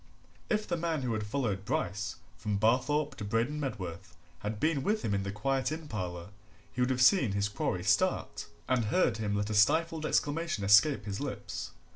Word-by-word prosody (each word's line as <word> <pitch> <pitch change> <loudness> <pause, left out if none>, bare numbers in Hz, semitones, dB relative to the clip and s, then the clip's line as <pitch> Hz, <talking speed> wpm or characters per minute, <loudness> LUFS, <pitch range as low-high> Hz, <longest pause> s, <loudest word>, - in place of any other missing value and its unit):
If 215 -1 0
the 175 - -1
man 165 -4 -1
who 120 -2 -1
had 110 -1 -3
followed 105 -5 -1
Bryce 100 -3 -2 0.2
from 105 -1 -2
Barthorpe 130 +7 +2
to 105 - -5
Braden 115 +8 0
Medworth 95 - -5 0.2
had 105 0 -4
been 155 0 +1
with 215 +8 0
him 100 - 0
in 100 - +1
the 100 0 -3
quiet 135 +7 -1
inn 155 0 -5
parlour 90 -6 -5 0.4
he 125 - -2
would 125 - +2
have 125 -1 +2
seen 130 - +5
his 100 0 +1
quarry 105 - -2
start, - - +1 0.2
and 125 -3 +2
heard 115 - +2
him 105 -2 -1
let 105 +1 -1
a - - -1
stifled 160 +9 +3
exclamation 155 -6 0
escape 105 +5 +5
his 100 -1 -4
lips. - - -5
115 Hz, 190 wpm, -31 LUFS, 100-150 Hz, 0.4 s, seen